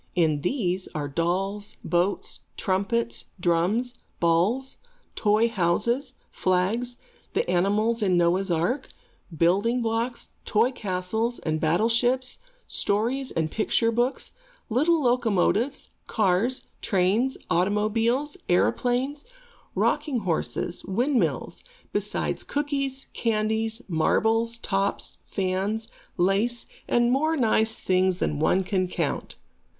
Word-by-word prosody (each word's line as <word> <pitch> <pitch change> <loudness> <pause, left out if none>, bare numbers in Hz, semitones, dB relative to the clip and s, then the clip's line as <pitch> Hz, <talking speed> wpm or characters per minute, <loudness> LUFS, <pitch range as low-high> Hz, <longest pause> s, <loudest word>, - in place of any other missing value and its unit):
In 155 -4 +2
this 185 - -1
are 150 -2 -2
dolls, 190 +7 -2
boats, 175 +4 0 0.2
trumpets, 200 +5 0
drums, 180 +9 +1 0.3
balls, 185 +11 +1 0.4
toy 215 +2 +3
houses, 235 - +1 0.2
flags, 210 +7 0 0.4
the - - +1
animals 205 +6 +2
in 185 -4 +3
Noah's 175 +3 +2
Ark, 175 - 0 0.5
building 200 +9 +3
blocks, 230 +2 -2
toy 225 +4 +2
castles 220 +2 -2
and 155 -1 -2
battleships, 235 +10 +2 0.3
story 230 +7 0
and 160 -1 0
picture 230 +1 +2
books, 240 +3 -1 0.4
little 310 +6 +3
locomotives, 240 +1 +1 0.2
cars, 215 +5 +1 0.2
trains, 205 +7 +1
automobiles, 220 - +1
aeroplanes, 250 +10 +1 0.5
rocking 295 -5 +1
horses, 175 -1 -1
windmills, 245 +7 0 0.3
besides - - -1
cookies, 275 -2 -2
candies, 220 +1 0
marbles, 225 +7 +2
tops, 195 -3 -2
fans, 195 +4 -1 0.3
lace, 200 +7 +1 0.2
and 240 0 +3
more 310 +5 +2
nice 220 -3 +2
things 185 0 +2
than 150 -4 -1
one 185 +5 +3
can 185 -1 0
count. - - -3
215 Hz, 100 wpm, -26 LUFS, 185-245 Hz, 0.5 s, toy